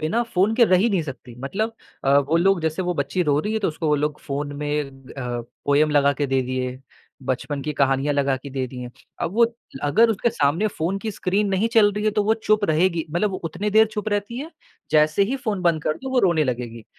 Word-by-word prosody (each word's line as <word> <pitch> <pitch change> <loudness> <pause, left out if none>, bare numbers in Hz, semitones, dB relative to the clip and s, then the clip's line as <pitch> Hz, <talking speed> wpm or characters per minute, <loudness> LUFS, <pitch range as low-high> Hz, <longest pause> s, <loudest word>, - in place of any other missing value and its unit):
बिना 165 +10 0
फ़ोन 220 -2 +1
के 235 0 +6
रही 185 -2 +4
ही 235 - +3
नहीं 190 -5 +1
सकती 130 -5 -9
मतलब 215 - -2 0.3
अ, 140 +1 +5
वो 145 +3 +1
लोग 185 +1 +3
जैसे 160 +3 -1
वो 180 0 -1
बच्ची 140 +4 -1
रो 145 -3 +2
रही 210 +6 -3
है, 220 - +1
तो 210 - 0
उसको 160 0 -4
वो 150 - +4
लोग 150 +1 -2
फ़ोन 145 0 -4
में 150 0 -1 0.3
अ, 125 -3 -3 0.2
पोएम 145 +2 +3
लगा 145 -1 +4
के 145 +1 -2
दे 135 -1 +1
दिए, 130 0 -3 0.4
बचपन 135 +2 -3
की 150 - -3
कहानियाँ 135 +1 +2
लगा 140 -1 +1
के 140 +2 -10
दे 130 -1 -2
दी 130 - -11
हैं। 125 0 -7 0.3
अब 170 - -2
वो 235 +3 +5 0.4
अगर 220 +11 +4
उसके 225 +2 +1
सामने 150 +4 +1
फ़ोन 195 -1 -2
की 220 +1 -4
स्क्रीन 200 +2 0
नहीं 195 +4 +1
चल 215 -3 +6
रही 210 +1 -3
है, 215 - +3
तो 210 0 +1
वो 220 +2 +3
चुप 215 -1 +1
रहेगी 165 0 +1
मतलब 175 +6 0
वो 190 - -3
उतने 205 +6 -2
देर 220 +1 +6
चुप 210 +1 -3
रहती 205 +3 -2
है, 300 +5 -6 0.4
जैसे 155 +4 +4
ही 235 +7 0
फ़ोन 215 -8 -3
बंद 165 -3 +2
कर 155 +1 -1
दो 265 - -4
वो 260 - +2
रोने 170 -5 +3
लगेगी। 120 -3 -4
160 Hz, 245 wpm, -23 LUFS, 140-210 Hz, 0.4 s, के